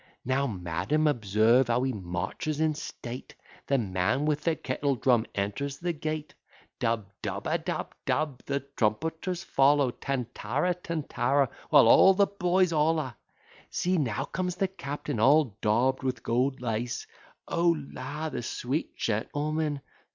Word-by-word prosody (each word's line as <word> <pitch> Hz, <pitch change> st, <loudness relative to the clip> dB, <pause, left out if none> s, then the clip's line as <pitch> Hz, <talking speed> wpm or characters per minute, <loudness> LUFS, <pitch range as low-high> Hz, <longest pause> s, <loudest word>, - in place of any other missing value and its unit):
Now, 130 Hz, +2 st, +1 dB
madam, 90 Hz, -, -1 dB
observe 115 Hz, -1 st, +3 dB
how 120 Hz, +1 st, +2 dB
he 130 Hz, -1 st, 0 dB
marches 105 Hz, -, -3 dB
in 155 Hz, -1 st, +2 dB
state: 125 Hz, -4 st, -7 dB, 0.3 s
The 140 Hz, -, +3 dB
man 105 Hz, +5 st, 0 dB
with 150 Hz, -1 st, +1 dB
the 165 Hz, -2 st, +2 dB
kettle 140 Hz, 0 st, -1 dB
drum 120 Hz, -2 st, +2 dB
enters 105 Hz, +8 st, -2 dB
the 175 Hz, 0 st, -2 dB
gate: 155 Hz, 0 st, -4 dB, 0.5 s
Dub, 115 Hz, -2 st, 0 dB, 0.2 s
dub, -, -, -3 dB
adub, -, -, -2 dB
dub. 150 Hz, -4 st, -1 dB
The 140 Hz, 0 st, 0 dB
trumpeters 160 Hz, -, -2 dB
follow. 140 Hz, -1 st, +3 dB
Tantara, 125 Hz, +5 st, -2 dB
tantara; 145 Hz, -6 st, 0 dB, 0.2 s
while -, -, +7 dB
all 190 Hz, +10 st, +7 dB
the 200 Hz, +1 st, +5 dB
boys 185 Hz, -2 st, +1 dB
holla. 155 Hz, -5 st, +1 dB, 0.5 s
See 180 Hz, 0 st, 0 dB
now 120 Hz, -7 st, -1 dB
comes 180 Hz, -1 st, -3 dB
the 195 Hz, +1 st, +1 dB
captain 145 Hz, -, -5 dB
all 135 Hz, -1 st, +4 dB
daub'd 120 Hz, +5 st, +2 dB
with 130 Hz, -3 st, -2 dB
gold 125 Hz, +3 st, 0 dB
lace: 120 Hz, +1 st, -2 dB, 0.4 s
O 170 Hz, -1 st, +2 dB, 0.2 s
la! 145 Hz, +5 st, -4 dB
the -, -, -4 dB
sweet 125 Hz, +5 st, -3 dB
gentleman! 145 Hz, +6 st, -1 dB
140 Hz, 135 wpm, -28 LUFS, 120-155 Hz, 0.5 s, while